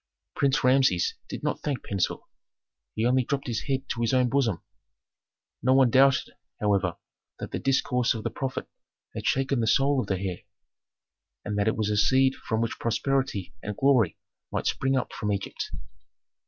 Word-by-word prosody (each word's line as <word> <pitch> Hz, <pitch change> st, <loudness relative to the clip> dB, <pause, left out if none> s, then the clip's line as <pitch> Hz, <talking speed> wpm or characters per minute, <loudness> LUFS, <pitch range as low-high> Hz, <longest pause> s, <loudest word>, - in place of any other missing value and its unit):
Prince 140 Hz, 0 st, +2 dB
Rameses 130 Hz, -8 st, +3 dB, 0.2 s
did -, -, -6 dB
not -, -, -1 dB
thank 140 Hz, -6 st, -3 dB
Pentuer, 100 Hz, -2 st, -2 dB, 0.7 s
he 110 Hz, -, 0 dB
only 130 Hz, +1 st, +3 dB
dropped 140 Hz, +2 st, -2 dB
his 115 Hz, -4 st, -3 dB
head 135 Hz, -1 st, -1 dB
to 120 Hz, -, -2 dB
his 115 Hz, +2 st, +2 dB
own 125 Hz, -1 st, +3 dB
bosom. 120 Hz, -, 0 dB, 1.0 s
No 130 Hz, +1 st, +3 dB
one 130 Hz, -3 st, +5 dB
doubted, 135 Hz, +1 st, +4 dB, 0.3 s
however, 100 Hz, -4 st, +1 dB, 0.4 s
that -, -, -7 dB
the -, -, -3 dB
discourse 125 Hz, -3 st, +1 dB
of 110 Hz, -, -5 dB
the -, -, -2 dB
prophet 135 Hz, -2 st, -4 dB, 0.5 s
had -, -, -4 dB
shaken 135 Hz, 0 st, +1 dB
the 115 Hz, -, 0 dB
soul 135 Hz, +4 st, +3 dB
of -, -, -6 dB
the 95 Hz, -, 0 dB
heir, 95 Hz, -2 st, -3 dB, 1.1 s
and 105 Hz, -, -2 dB
that 100 Hz, -, +1 dB
it 110 Hz, -, +1 dB
was 105 Hz, -1 st, 0 dB
a 105 Hz, -, 0 dB
seed 130 Hz, +5 st, +4 dB
from 110 Hz, -4 st, -3 dB
which 115 Hz, -, -2 dB
prosperity 130 Hz, -4 st, -1 dB
and 105 Hz, 0 st, -5 dB
glory 130 Hz, -, +3 dB, 0.3 s
might -, -, -2 dB
spring 135 Hz, 0 st, +1 dB
up 125 Hz, -, -2 dB
for 105 Hz, -1 st, -2 dB
Egypt. 100 Hz, -1 st, -3 dB
125 Hz, 175 wpm, -27 LUFS, 105-135 Hz, 1.1 s, one